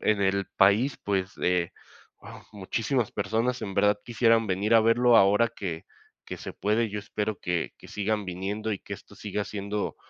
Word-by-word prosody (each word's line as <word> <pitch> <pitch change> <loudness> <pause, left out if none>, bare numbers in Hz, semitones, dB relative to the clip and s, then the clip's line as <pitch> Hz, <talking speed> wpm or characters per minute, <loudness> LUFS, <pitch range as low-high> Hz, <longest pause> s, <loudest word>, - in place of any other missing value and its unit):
en 105 -2 +2
el 100 0 +1
país, 105 +8 +4
pues, 95 -2 -1
eh, 90 -2 +1 0.5
wao, - - -12
muchísimas 110 +4 -1
personas 120 +3 -1
en 100 -2 -5
verdad 105 +1 +3
quisieran 115 -1 +3
venir 100 +4 +1
a 115 - +8
verlo 115 +2 +4
ahora 105 +3 +5
que 85 -7 -5 0.4
que - - -6
se - - -7
puede, 110 +3 0
yo 105 - -4
espero 105 +1 -3
que 90 -2 -2
que - - -14
sigan 105 0 -1
viniendo 100 +4 -3
y 100 - -3
que - - -7
esto - - -15
siga 105 0 -3
siendo 100 +1 -4
105 Hz, 180 wpm, -27 LUFS, 100-115 Hz, 0.5 s, a